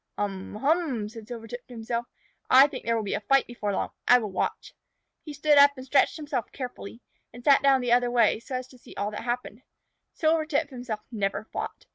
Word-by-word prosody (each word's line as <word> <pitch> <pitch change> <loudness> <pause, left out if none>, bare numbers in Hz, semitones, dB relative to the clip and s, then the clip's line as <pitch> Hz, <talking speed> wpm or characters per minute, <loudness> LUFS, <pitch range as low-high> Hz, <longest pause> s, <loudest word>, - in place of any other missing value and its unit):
"Um 195 -1 -4
hum!" 270 -4 0
said 225 -1 -11
Silvertip 240 0 -8
to 245 - -11
himself. 235 +1 -3 0.4
"I 265 +2 +8
think 290 - -6
there 230 - +1
will 225 - -1
be 200 - -3
a - - 0
fight 275 +6 +3
before 225 -4 -4
long. 195 - -2 0.2
I 245 - +8
will 215 -5 -4
watch." 185 - -3 0.5
He 305 - -8
stood 290 0 +4
up 285 0 +6
and 260 - -8
stretched 275 +4 +2
himself 285 -6 -4
carefully 245 -3 -8 0.3
and 245 +1 -12
sat 280 0 +5
down 275 -2 +4
the 245 -1 -1
other 245 0 +4
way, 240 -2 +3
so 255 +3 -7
as 255 0 -4
to 255 - -17
see - - -15
all 205 +1 -2
that 210 - -6
happened. 240 -2 -4 0.5
Silvertip 310 -2 +1
himself 245 -4 -5
never 200 -3 -2
fought. - - -6
245 Hz, 210 wpm, -26 LUFS, 220-275 Hz, 0.5 s, I